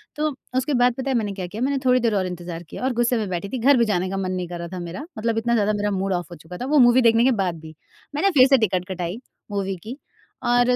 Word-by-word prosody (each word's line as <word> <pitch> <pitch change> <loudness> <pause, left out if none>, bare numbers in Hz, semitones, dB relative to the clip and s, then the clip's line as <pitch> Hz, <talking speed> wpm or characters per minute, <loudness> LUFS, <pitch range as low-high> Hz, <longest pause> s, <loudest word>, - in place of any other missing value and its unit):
तो 305 +1 0 0.3
उसके 265 +3 0
बाद 245 -1 +3
पता 270 +1 -3
है 265 - +1
मैंने 210 -3 -2
क्या 185 -2 -5
किया? 210 +6 -7
मैंने 275 +2 +1
थोड़ी 255 0 +5
देर 230 -3 +1
और 190 -2 +1
इंतज़ार 175 -1 -6
किया 170 - -9
और 260 0 +1
गुस्से 240 +1 +1
में 215 -2 -2
बैठी 180 +2 -3
थी, 260 - -3
घर 270 +3 +5
भी 235 - +4
जाने 185 -3 0
का 195 - -3
मन 185 -1 -2
नहीं 180 -1 -3
कर 175 0 -6
रहा 170 - -5
था 185 - -4
मेरा। 175 - -6
मतलब 225 +1 -1
इतना 235 +1 +1
ज़्यादा 215 -2 +2
मेरा 205 0 -1
मूड 195 0 -1
ऑफ 175 0 -3
हो - - -7
चुका 165 +3 -10
था 250 - -4
वो 295 +3 +2
मूवी 245 0 +6
देखने 230 -1 +4
के 265 - +5
बाद 175 -3 -2
भी। 160 0 -12 0.4
मैंने 330 +7 +3
फ़िर 265 -6 +6
से 270 0 +5
टिकट 185 -6 0
कटाई 180 +3 -4 0.3
मूवी 195 -1 -2
की 240 +5 -7 0.5
और 245 +1 +4
215 Hz, 290 wpm, -23 LUFS, 180-250 Hz, 0.5 s, मूवी